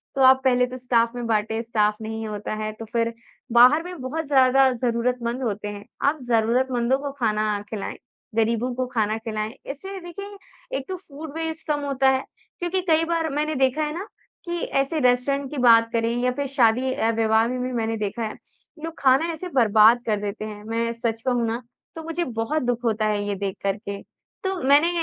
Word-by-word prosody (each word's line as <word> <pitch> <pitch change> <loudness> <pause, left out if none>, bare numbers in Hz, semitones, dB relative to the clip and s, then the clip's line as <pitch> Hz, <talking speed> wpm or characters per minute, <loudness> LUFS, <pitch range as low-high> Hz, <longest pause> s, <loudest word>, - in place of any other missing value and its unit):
तो 270 - 0
आप 260 0 +7
पहले 250 -1 +4
तो 255 +1 -7
स्टाफ़ 235 -2 +2
में 245 -1 -4
बाँटे। 220 0 0
स्टाफ़ 215 -2 +1
नहीं 220 0 -4
होता 210 0 -4
है 215 - -2
तो 225 +1 -9
फिर 230 +1 -1 0.4
बाहर 250 +7 +6
में 360 -1 -8
बहुत 305 +5 -3
ज़्यादा 265 -1 +5
ज़रूरतमंद 240 0 -1
होते 210 -3 -2
हैं, 205 0 -7 0.2
आप 290 +2 +2
ज़रूरतमंदों 245 +2 +2
को 285 0 -4
खाना 215 -3 0
खिलाएँ, 210 -3 -5 0.4
गरीबों 230 +2 +1
को 255 +1 -1
खाना 220 -4 0
खिलाएँ। 220 -1 -4
इससे 385 +8 -6
देखिए 400 +4 -8 0.4
एक 270 - -7
तो 375 - -2
फूड 310 -4 -10
वेस्ट 320 0 -4
कम 300 -1 +1
होता 270 -1 +2
है। 265 0 +1 0.4
क्योंकि 350 +2 -1
कई 320 0 +4
बार 330 -1 0
मैंने 305 +1 0
देखा 265 +3 +2
है 300 0 -2
ना 390 +4 -5 0.4
कि 345 0 -2 0.2
ऐसे 290 +4 -2
रेस्टोरेंट 265 +2 +2
की 295 - -5
बात 230 -2 +6
करें 230 0 +1
या 250 - +3
फिर 285 +3 -3
शादी 255 -1 +3
अ, 225 - +1
विवाह 225 0 +2
में 255 +1 -3
भी 255 +1 -2
मैंने 225 -1 -1
देखा 215 +2 -3
है 215 - -3 0.5
लोग 330 0 -4
खाना 275 +5 +3
ऐसे 325 +3 -6
बर्बाद 225 0 +6
कर 215 -2 +1
देते 210 +1 -4
हैं, 210 -1 -8
मैं 230 +1 -1
सच 230 -1 -2
कहूँ 245 -1 +1
ना 230 +2 -2 0.3
तो 325 - -7
मुझे 330 +2 -2
बहुत 235 +6 -2
दुख 245 0 -1
होता 220 -1 +1
है 210 -1 0
ये 205 - -1
देखकर 195 0 -2
के, 200 -2 -6 0.4
तो 385 0 -1
मैंने 285 +5 +5
245 Hz, 200 wpm, -24 LUFS, 225-280 Hz, 0.5 s, आप